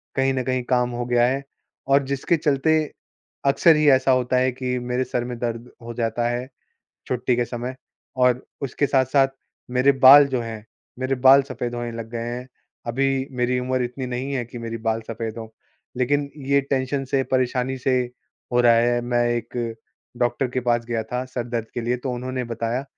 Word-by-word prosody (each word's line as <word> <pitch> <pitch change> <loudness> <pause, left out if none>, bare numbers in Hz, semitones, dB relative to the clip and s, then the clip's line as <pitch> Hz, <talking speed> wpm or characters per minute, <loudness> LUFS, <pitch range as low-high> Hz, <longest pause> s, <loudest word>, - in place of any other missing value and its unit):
कहीं 135 0 +2
न 130 -1 -1
कहीं 130 -1 -1
काम 125 -1 +2
हो 120 0 -3
गया 120 -1 +3
है 135 +2 -1 0.4
और 140 +1 +4
जिसके 140 +5 0
चलते 150 +1 +2 0.7
अक्सर 160 +3 +5
ही 150 -1 +3
ऐसा 130 0 +4
होता 125 0 +2
है 130 0 +2
कि 125 0 -3
मेरे 125 +1 -1
सर 120 - -2
में 125 -1 -5
दर्द 120 0 -4
हो 120 0 -6
जाता 120 0 0
है 120 +1 -3 0.6
छुट्टी 125 -1 0
के 120 - +1
समय 125 +2 -5 0.4
और 125 0 +2 0.2
उसके 140 +2 0
साथ-साथ 135 0 +3 0.4
मेरे 130 +3 +4
बाल 135 +2 +8
जो 130 -2 -1
हैं, 110 -2 -7 0.3
मेरे 130 +1 0
बाल 135 +1 +9
सफ़ेद 125 -3 -5
होने 120 -1 -4
लग 115 -1 -6
गए 115 - -3 0.2
हैं। 125 +1 -8 0.4
अभी 135 +2 0
मेरी 125 0 0
उम्र 130 0 -1
इतनी 125 +1 -5
नहीं 125 +3 -3
है 125 -2 -1
कि 120 - -9
मेरी 115 0 -5
बाल 110 0 +1
सफ़ेद 115 0 -5
हों। 110 -1 -7 0.5
लेकिन 140 +3 +1 0.2
ये 140 0 +4
टेंशन 135 +1 0
से 135 -1 +3
परेशानी 130 0 +1
से 130 0 +1 0.5
हो 125 - +4
रहा 120 -1 +6
है। 120 +1 +3
मैं 120 0 +1
एक 115 -1 -4 0.4
डॉक्टर 120 +2 0
के 130 +1 -2
पास 120 0 +1
गया 115 -2 -1
था 125 +1 -1
सर 125 -2 -4
दर्द 115 -2 -2
के 120 - -2
लिए 120 +2 0
तो 130 - -1
उन्होंने 130 +1 -3
बताया 120 +4 -2
125 Hz, 195 wpm, -23 LUFS, 120-130 Hz, 0.7 s, बाल